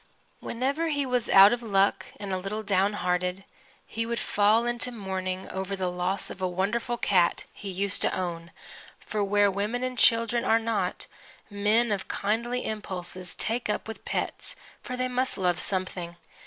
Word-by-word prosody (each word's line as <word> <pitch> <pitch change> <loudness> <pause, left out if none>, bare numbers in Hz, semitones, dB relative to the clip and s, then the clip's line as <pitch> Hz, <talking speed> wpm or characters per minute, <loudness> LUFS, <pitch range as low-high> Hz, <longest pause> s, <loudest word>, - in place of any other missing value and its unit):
Whenever 275 +7 -1
he 285 -3 0
was 250 -3 0
out 195 +3 +9
of 240 - -2
luck 200 -3 +2
and 200 -2 -4
a 185 - 0
little 205 +3 -4
downhearted, 185 -2 +1 0.4
he 230 - -3
would 235 +1 -2
fall 215 +3 +3
to 250 - -1
mourning 190 -4 -4
over 190 +1 -3
the 185 -2 -1
loss 180 +2 -2
of 190 - -9
a 185 - +1
wonderful 210 +7 -1
cat 185 -7 +2
he 200 - -7
used 195 +1 0
to - - +4
own 170 -2 -4 0.5
(for 210 -1 -2
where 205 0 +3
women 210 +6 -2
and 255 -1 -3
children 230 0 +4
are 225 - +4
not, 230 0 -1 0.5
men 210 +3 +2
of 195 -2 -2
kindly 235 +4 -1
impulses 185 -4 -5
take 230 +1 -1
up 210 - -1
with 220 - -8
pets, - - -2 0.3
for 250 - -5
they 255 0 0
must 255 +1 0
love 180 -2 +1
something). 185 -3 -3
205 Hz, 170 wpm, -27 LUFS, 185-235 Hz, 0.5 s, out